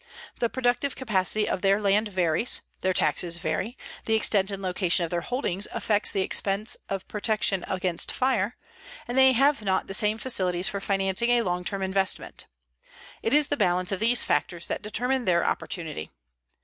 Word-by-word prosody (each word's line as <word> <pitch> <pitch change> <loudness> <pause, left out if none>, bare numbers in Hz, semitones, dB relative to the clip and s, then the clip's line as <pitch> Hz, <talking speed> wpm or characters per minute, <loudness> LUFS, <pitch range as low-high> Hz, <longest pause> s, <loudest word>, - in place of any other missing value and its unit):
The 235 - +1
productive 255 +2 0
capacity 210 -3 0
of 185 - -2
their 195 +1 +3
land 210 +1 +2
varies, 185 +2 0 0.2
their 185 - +1
taxes 170 -1 +1
vary, 185 +10 -3 0.3
the 220 - +2
extent 205 -3 +2
and 195 -1 -1
location 180 -2 0
of 165 - -8
their 175 -1 -1
holdings 210 -4 -1
affects 210 -1 0
the 195 - 0
expense 200 +3 +2
of 195 -1 -4
protection 210 -3 0
against 185 -2 -1
fire, 250 -4 0 0.5
and 240 - -4
they 265 0 +6
have 275 +1 +3
not 190 -2 0
the 195 - -7
same 210 +2 +1
facilities 185 -7 0
for 200 - -3
financing 195 +3 +1
a 240 -1 +3
long 180 -2 -2
term 195 +1 -2
investment. 190 0 -2 0.8
It 225 - -1
is 295 -1 +4
the 290 - 0
balance 180 -2 +1
of 195 - -2
these 235 +3 +3
factors 170 -2 -1
that - - -4
determine 250 +4 -1
their 170 -2 +2
opportunity. 160 - -2
195 Hz, 175 wpm, -26 LUFS, 185-230 Hz, 0.8 s, they